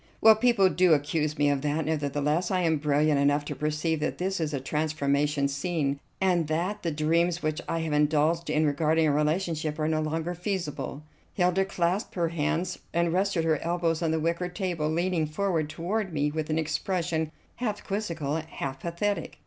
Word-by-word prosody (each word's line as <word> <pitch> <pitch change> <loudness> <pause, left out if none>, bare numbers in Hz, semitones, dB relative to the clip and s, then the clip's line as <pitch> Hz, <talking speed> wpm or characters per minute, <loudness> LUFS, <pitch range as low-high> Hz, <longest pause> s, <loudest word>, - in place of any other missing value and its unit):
"Well, 220 0 +8
people 220 -4 +4
do 180 -1 +4
accuse 150 +1 0
me 145 0 +3
of 140 -1 0
that; 150 +2 -1
nevertheless 150 +2 0
I 185 -1 +1
am 160 -2 +2
brilliant 150 0 +2
enough 145 +1 +2
to 145 - -4
perceive 150 +3 -1
that 150 - -2
this 190 +1 -1
is 155 -2 -1
a 140 - -2
transformation 145 0 0
scene, 145 -1 -1 0.2
and 180 -4 +2
that 180 +7 -1
the 170 - -1
dreams 165 +3 +1
which 155 0 -1
I 165 - 0
have 160 -2 -2
indulged 150 +3 +2
in 155 +1 +2
regarding 155 +2 +2
our 145 - +2
relationship 155 0 0
are 155 -1 0
no 155 -1 +1
longer 160 +3 -2
feasible." 160 -6 -4 0.3
Hilda 180 +1 +2
clasped 185 +1 -1
her 170 -2 +1
hands 170 +3 -1
and 170 0 +1
rested 185 -3 +1
her 160 -3 +2
elbows 170 -1 0
on 165 - +1
the 160 0 +1
wicker 170 +3 -1
table, 175 -4 -2
leaning 170 0 0
forward 160 -1 -1
toward 190 +5 -2
me 150 -1 0
with 155 0 -3
an 155 - +1
expression 160 0 -1 0.3
half 215 -4 -3
quizzical, 170 -8 -2
half 140 -4 -5
pathetic. 175 +6 -2
160 Hz, 180 wpm, -27 LUFS, 150-175 Hz, 0.3 s, Well